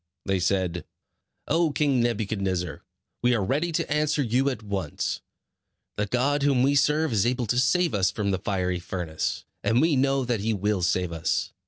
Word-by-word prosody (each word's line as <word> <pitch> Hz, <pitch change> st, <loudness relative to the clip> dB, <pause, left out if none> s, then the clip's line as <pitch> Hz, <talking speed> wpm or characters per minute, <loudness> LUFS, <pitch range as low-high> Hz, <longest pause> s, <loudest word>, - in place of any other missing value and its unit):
They 95 Hz, -1 st, +1 dB
said: 90 Hz, -2 st, 0 dB, 0.6 s
"O 165 Hz, +1 st, +2 dB
King 140 Hz, -3 st, +2 dB
Nebuchadnezzar, 100 Hz, -8 st, -1 dB, 0.4 s
we 125 Hz, 0 st, +3 dB
are 100 Hz, -4 st, 0 dB
ready 150 Hz, -, 0 dB
to -, -, -1 dB
answer 150 Hz, -1 st, +1 dB
you 130 Hz, +3 st, +1 dB
at 125 Hz, -5 st, -5 dB
once. 95 Hz, -7 st, -3 dB, 0.7 s
The 105 Hz, 0 st, -1 dB
God 135 Hz, +6 st, +1 dB
whom 140 Hz, -3 st, +3 dB
we 140 Hz, +2 st, +3 dB
serve 150 Hz, 0 st, +2 dB
is 100 Hz, -3 st, +3 dB
able 125 Hz, 0 st, 0 dB
to 120 Hz, +3 st, +1 dB
save 170 Hz, +6 st, +2 dB
us 95 Hz, -2 st, +2 dB
from 105 Hz, -1 st, -2 dB
the 95 Hz, -, -1 dB
fiery 90 Hz, -2 st, -1 dB
furnace, 85 Hz, -2 st, -3 dB, 0.2 s
and 115 Hz, +4 st, +3 dB
we 160 Hz, 0 st, +3 dB
know 135 Hz, 0 st, +2 dB
that 120 Hz, -3 st, 0 dB
he 110 Hz, +3 st, 0 dB
will 105 Hz, 0 st, 0 dB
save 90 Hz, 0 st, 0 dB
us. 80 Hz, 0 st, -1 dB
115 Hz, 180 wpm, -26 LUFS, 95-135 Hz, 0.7 s, we